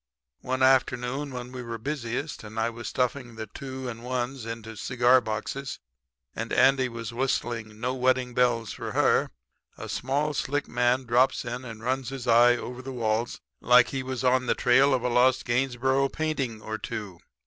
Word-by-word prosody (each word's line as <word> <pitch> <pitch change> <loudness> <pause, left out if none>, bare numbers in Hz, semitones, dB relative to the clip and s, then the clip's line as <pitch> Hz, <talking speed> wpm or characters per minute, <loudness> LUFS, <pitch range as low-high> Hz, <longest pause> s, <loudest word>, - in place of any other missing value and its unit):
"One 130 +1 -1
afternoon 130 +1 +2
when 125 -1 -6
we 125 -1 -6
were 115 -1 -5
busiest 135 +2 -4
and 110 +1 -6
I 115 +1 +1
was 120 0 -7
stuffing 125 -1 -2
the 110 0 -5
two 130 +2 -7
and 115 -1 -6
ones 125 -1 -3
into 115 -1 -6
cigar 125 +4 +3
boxes 120 +5 -4 0.6
and - - -4
Andy 130 0 +4
was 115 -1 -6
whistling 115 -4 -2
'No 125 +2 -1
Wedding 130 -1 +1
Bells 120 -3 +1
for - - -6
Her' - - +3 0.5
a - - -7
small 145 +4 -1
slick 145 +1 -1
man 125 +2 +1
drops 125 +2 +2
in 125 +1 -4
and 115 -3 -9
runs 130 0 -1
his 135 -2 -6
eye 120 +1 +6
over 125 +2 -7
the 135 +1 -7
walls 115 -1 -1 0.2
like 125 0 +6
he 135 - -3
was 130 0 -4
on 125 0 +3
the - - +2
trail 130 +3 +4
of 125 - -2
a - - +1
lost 125 +1 +3
Gainesborough 130 +2 +1
painting 135 -9 -2
or 110 0 -4
two. 105 -7 -6
125 Hz, 180 wpm, -27 LUFS, 115-130 Hz, 0.6 s, eye